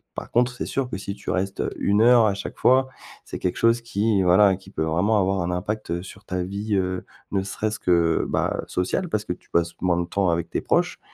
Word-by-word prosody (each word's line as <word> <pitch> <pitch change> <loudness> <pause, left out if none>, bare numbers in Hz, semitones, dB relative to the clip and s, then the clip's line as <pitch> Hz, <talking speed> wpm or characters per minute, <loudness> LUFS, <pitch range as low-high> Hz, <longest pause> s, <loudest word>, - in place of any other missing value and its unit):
par - - -7
contre 125 +1 +3
c'est 125 - -5
sûr 135 -2 -2
que - - -4
si 100 +1 -6
tu - - -8
restes, 95 +1 -2
heu, - - -1
une 100 +2 +2
heure 120 0 +6
à 100 - +1
chaque 100 - -7
fois, 130 +1 +4 0.4
c'est - - -7
quelque 90 - -1
chose 115 +1 +3
qui, 110 -2 +1
voilà, 95 +2 +5
qui 95 - -16
peut 80 - -2
vraiment 90 +8 +2
avoir 95 0 +1
un 85 - -2
impact, 105 +2 -3
heu, 85 +1 -2
sur 100 +1 -12
ta 90 -2 -2
vie, 100 +3 -3
heu, 95 -1 -1 0.3
ne 100 - +1
serait-ce 105 +3 -3
que, 85 -2 +2
bah, - - 0
sociale, 90 - -1
parce 105 -8 -1
que - - -4
tu - - -20
passes 85 0 +1
moins 90 -2 +2
de - - -2
temps 100 +1 0
avec 85 0 -1
tes - - -1
proches - - 0
100 Hz, 240 wpm, -24 LUFS, 90-110 Hz, 0.4 s, heure